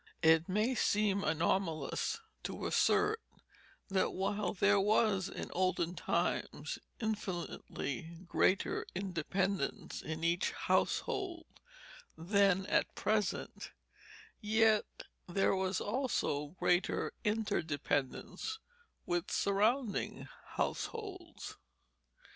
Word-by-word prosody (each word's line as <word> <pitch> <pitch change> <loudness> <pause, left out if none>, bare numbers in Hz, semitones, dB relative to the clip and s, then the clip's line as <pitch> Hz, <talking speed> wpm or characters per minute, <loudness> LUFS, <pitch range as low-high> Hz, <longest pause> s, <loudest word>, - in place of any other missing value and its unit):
It 160 +1 +5
may 215 +7 +2
seem 205 -4 +2
anomalous 165 - 0 0.2
to - - -5
assert 445 +2 +3 0.7
that 190 -1 +1
while 195 0 0
there 200 +1 +4
was 200 -1 +3
in - - -6
olden 180 -2 +1
times - - -1 0.2
infinitely 175 - -3
greater 185 +2 +2
independence 190 -1 -1
in 160 +1 -5
each 170 +2 +1
household 350 -4 0 0.7
than 195 +1 +3
at - - +1
present, 210 -2 -1 0.7
yet 220 0 +3 0.4
there 195 +2 +2
was 190 0 0
also 205 - -1
greater 175 +1 +2
interdependence 175 - -1 0.5
with 175 +1 -1
surrounding 215 +4 +1 0.3
households. - - -4
195 Hz, 85 wpm, -34 LUFS, 175-210 Hz, 0.7 s, It